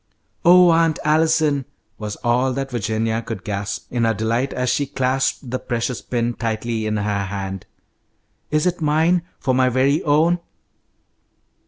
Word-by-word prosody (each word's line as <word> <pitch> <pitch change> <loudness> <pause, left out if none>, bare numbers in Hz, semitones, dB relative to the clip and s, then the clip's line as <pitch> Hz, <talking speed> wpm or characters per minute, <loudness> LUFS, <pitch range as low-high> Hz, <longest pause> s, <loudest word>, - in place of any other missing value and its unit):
"Oh, 180 -1 +7
Aunt 165 -1 +3
Allison!" 155 -2 +2 0.3
was 105 -1 -4
all 125 +2 +2
that 135 +1 -4
Virginia 110 0 -1
could 110 -5 -6
gasp 100 0 -4
in 120 -1 0
her 115 -1 +2
delight 115 +5 -1
as 125 -1 -1
she 145 - 0
clasped 130 -1 -1
the 130 - -1
precious 120 0 -3
pin 120 -1 -1
tightly 115 -1 -2
in 110 0 -1
her 105 -1 -1
hand. 95 -1 -5 0.8
"Is 150 +1 +1
it 180 -1 0
mine? 160 +4 +2 0.2
For 130 - 0
my 130 0 +3
very 135 +4 +2
own?" 160 +4 +2
125 Hz, 150 wpm, -21 LUFS, 110-150 Hz, 0.8 s, Oh